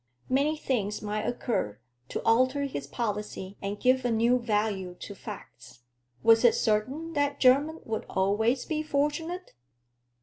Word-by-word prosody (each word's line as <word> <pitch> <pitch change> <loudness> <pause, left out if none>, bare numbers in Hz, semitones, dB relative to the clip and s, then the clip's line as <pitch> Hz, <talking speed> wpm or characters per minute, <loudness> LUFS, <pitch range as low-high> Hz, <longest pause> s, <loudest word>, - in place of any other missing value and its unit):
Many 285 +4 +2
things 210 -9 -2
might 210 0 -2
occur 165 - -2 0.3
to - - -4
alter 255 +5 +3
his 145 - -4
policy 210 0 -4
and 200 +1 -4
give 255 +2 +3
a 245 - +1
new 235 +2 +3
value 210 -5 -1
to 205 - -7
facts. 190 - -11 0.4
Was 225 +1 +6
it 240 - +6
certain 260 +10 0
that 285 -1 0
Jermyn 285 +5 +4
would 220 -1 -3
always 220 +7 +1
be 310 -1 -1
fortunate? 310 +4 -2
235 Hz, 140 wpm, -28 LUFS, 210-280 Hz, 0.4 s, Was